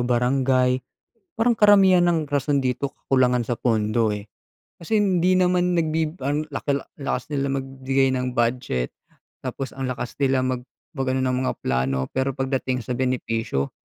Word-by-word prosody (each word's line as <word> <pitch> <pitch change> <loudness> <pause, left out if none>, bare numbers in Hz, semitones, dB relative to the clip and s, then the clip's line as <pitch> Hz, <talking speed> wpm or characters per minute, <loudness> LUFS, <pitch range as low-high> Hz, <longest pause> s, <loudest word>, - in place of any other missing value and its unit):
barangay. 125 +1 +2 0.6
Parang 235 +2 +3
karamihan 195 -4 +6
ng 160 -3 +1
rason 140 0 +1
dito, 130 +2 -1
kakulangan 125 -2 +2
sa 120 0 -3
pondo, 110 -1 +1
eh. 105 +1 -8 0.5
Kasi 210 +6 0
hindi 185 -2 +2
naman 180 -1 +2
nagbi 160 0 0
ang 145 +3 -1
laki, 140 0 -1 0.2
lakas 140 +2 -2
nila 140 -1 0
magbigay 135 0 0
ng 125 -1 -2
budget 115 - 0 0.5
tapos 135 - -5
ang 135 -1 -3
lakas 125 -1 -4
nila 130 -1 +2
mag 130 -1 -1 0.3
mag-ano 130 -2 -1
ng 130 0 +1
mga - - 0
plano, 65 +1 0
pero 130 +1 -1
pagdating 130 -2 -1
sa 125 - -3
benepisyo, 115 - -1
130 Hz, 145 wpm, -23 LUFS, 125-145 Hz, 0.6 s, karamihan